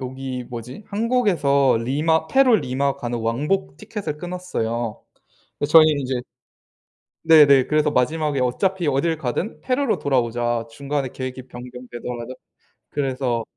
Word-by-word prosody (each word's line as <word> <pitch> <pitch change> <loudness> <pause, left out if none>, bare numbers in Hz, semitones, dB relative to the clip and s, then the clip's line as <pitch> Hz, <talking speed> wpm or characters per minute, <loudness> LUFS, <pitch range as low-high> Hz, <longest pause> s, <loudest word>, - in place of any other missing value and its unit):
여기 130 -1 -5
뭐지? 125 - -8
한국에서 190 - +2
리마 160 +6 +1
페루 265 -4 +5
리마 135 -2 -1
가는 120 0 -3
왕복 145 +12 -1
티켓을 205 -8 -5
끊었어요. 120 -11 -4 0.6
근데 145 - -2
저희는 155 -2 +6
이제 130 -1 -2 1.1
네 160 -2 +8
네. 135 -2 +5
그래서 150 -1 +2
마지막에 150 +2 +1
"어차피 175 +8 0
어딜 155 +4 +1
가든 150 - -3
페루로 260 -1 0
돌아오자. 120 -3 0
중간에 140 +3 -3
계획이 130 0 -6
변경되더라도." 125 0 -7 0.6
그래서 130 -4 -1
140 Hz, 310 characters per minute, -22 LUFS, 125-160 Hz, 1.1 s, 네